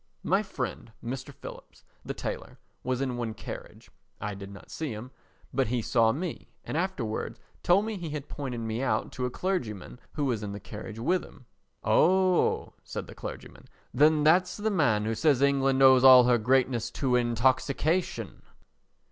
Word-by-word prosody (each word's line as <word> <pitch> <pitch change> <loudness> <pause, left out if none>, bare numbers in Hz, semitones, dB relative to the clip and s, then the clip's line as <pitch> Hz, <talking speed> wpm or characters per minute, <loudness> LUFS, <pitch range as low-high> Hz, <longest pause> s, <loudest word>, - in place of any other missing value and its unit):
My 195 +5 +2
friend 130 - -5
Mr. 130 +4 -5
Phillips, - - -12 0.2
the - - -5
tailor, - - -5 0.3
was 130 0 -1
in 130 -3 -2
one 115 -2 -3
carriage, - - -9 0.3
I 105 - -3
did 100 0 -8
not 100 0 -13
see 155 -4 -4
him, 115 +5 -8 0.4
but 135 -1 +1
he 120 0 -1
saw 115 -1 +3
me 165 +6 -5
and - - -5
afterwards 160 - -2 0.2
told 195 +4 +4
me 220 -2 -3
he 170 -3 -5
had 145 -1 -5
pointed 130 -5 -5
me 115 +1 -3
out 110 -5 0
to 125 -1 -2
a - - -3
clergyman 125 - -3
who 145 - -1
was 120 -5 0
in 100 -1 -5
the 100 - -6
carriage 105 +3 -8
with 175 +11 +1
him. 125 - -15 0.4
"Oh," 185 +1 +3
said - - -6
the - - -11
clergyman, - - -9 0.3
"then 150 +3 +4
that's 180 +4 +4
the 215 +1 -1
man 125 - +2
who 110 - 0
says 145 +2 +3
England 135 -1 +3
owes 130 -1 +7
all 130 -1 +10
her 120 -1 +3
greatness 125 0 +2
to 130 -4 +1
intoxication." 130 +8 0
130 Hz, 175 wpm, -28 LUFS, 115-155 Hz, 0.4 s, all